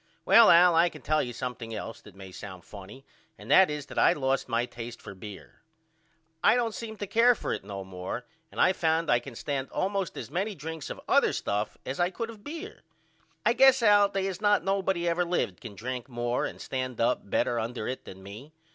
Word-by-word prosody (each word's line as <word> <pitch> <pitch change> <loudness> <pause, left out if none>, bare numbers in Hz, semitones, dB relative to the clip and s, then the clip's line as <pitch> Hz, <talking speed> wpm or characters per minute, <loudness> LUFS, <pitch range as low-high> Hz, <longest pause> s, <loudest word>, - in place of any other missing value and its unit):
Well 230 -1 +8
Al 175 +1 +7
I 170 +2 +5
can 155 -4 -13
tell 155 0 +2
you 120 - -4
something 120 -2 -5
else 115 +2 -7
that 105 - -16
may 95 -1 -11
sound 95 -2 -10
funny 105 +6 -12 0.3
and - - -8
that 190 -2 +7
is 150 -2 -4
that - - -4
I - - +5
lost 135 -2 -1
my 120 0 +1
taste 120 -1 -8
for - - -10
beer. 100 +1 -11 0.8
I 220 - +6
don't 235 -3 0
seem 220 -1 -7
to 205 - -4
care 230 +4 +4
for - - -3
it - - -5
no 100 -1 -6
more 95 +5 -6 0.3
and - - -9
I 185 - +5
found 165 -1 +1
I 120 - +4
can 120 0 -11
stand 135 +1 -3
allmost 195 -1 -2
as - - -7
many 195 +4 -2
drinks 160 -1 -7
of - - -6
other - - +3
stuff 105 +1 -2
as 130 - -4
I 175 0 +3
could 230 +4 -5
of 210 -2 -15
beer. 335 +8 -8 0.6
I 235 - +4
guess 265 -1 +5
Al 205 -2 +6
they 195 -1 -2
is 195 0 -4
not 205 -1 +3
nobody 190 -3 0
ever 170 +1 +2
lived 175 -3 -2
can 115 -6 -9
drink 125 +4 -5
more 120 0 -1
and - - -10
stand 130 -2 -4
up 115 -3 0
better 120 +3 +1
under 115 0 -4
it 130 - -5
than 95 0 -11
me. 110 +10 -11
145 Hz, 220 wpm, -28 LUFS, 115-195 Hz, 0.8 s, Well